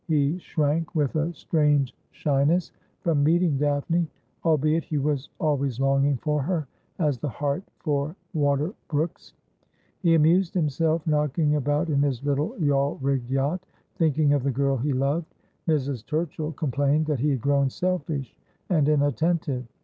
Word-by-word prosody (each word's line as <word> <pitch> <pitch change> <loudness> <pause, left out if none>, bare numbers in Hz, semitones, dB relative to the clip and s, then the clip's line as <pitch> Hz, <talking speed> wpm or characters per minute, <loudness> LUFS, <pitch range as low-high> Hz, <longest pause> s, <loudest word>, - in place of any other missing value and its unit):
He 155 +1 +1
shrank 155 0 -1
with 145 -3 +1
a 155 +2 0
strange 145 -5 +1
shyness 150 +3 +1 0.3
from 155 -4 +2
meeting 165 -2 +3
Daphne; 150 +4 +1 0.4
albeit 155 0 +2
he 155 - -3
was 145 -1 -1
always 140 -5 0
longing 135 +1 +2
for 150 +2 -1
her 155 0 -1 0.3
as 150 -7 0
the 150 - -2
hart 145 - -2 0.2
for 145 +1 -1 0.2
water 145 +2 +1
brooks. 155 +2 -3 0.6
He 170 -3 +4
amused 170 +4 +3
himself 160 0 +1
knocking 150 0 +1
about 145 +3 0
in 140 -1 +2
his 140 -3 0
little 145 +2 -1
yawl 145 -1 +1
rigged 135 -2 -1
yacht, 140 +7 0 0.3
thinking 155 -3 +3
of 145 - +2
the 140 - 0
girl 135 +1 +1
he 135 +4 -1
loved. 140 +5 -1 0.3
Mrs. 140 -6 0
Turchill 155 +1 -3
complained 145 +1 +1
that 150 -4 -1
he 150 +4 +2
had 135 -4 0
grown 140 0 +2
selfish 160 -5 -2 0.4
and 155 -4 +3
inattentive. 145 -2 +1
150 Hz, 150 wpm, -25 LUFS, 140-160 Hz, 0.6 s, He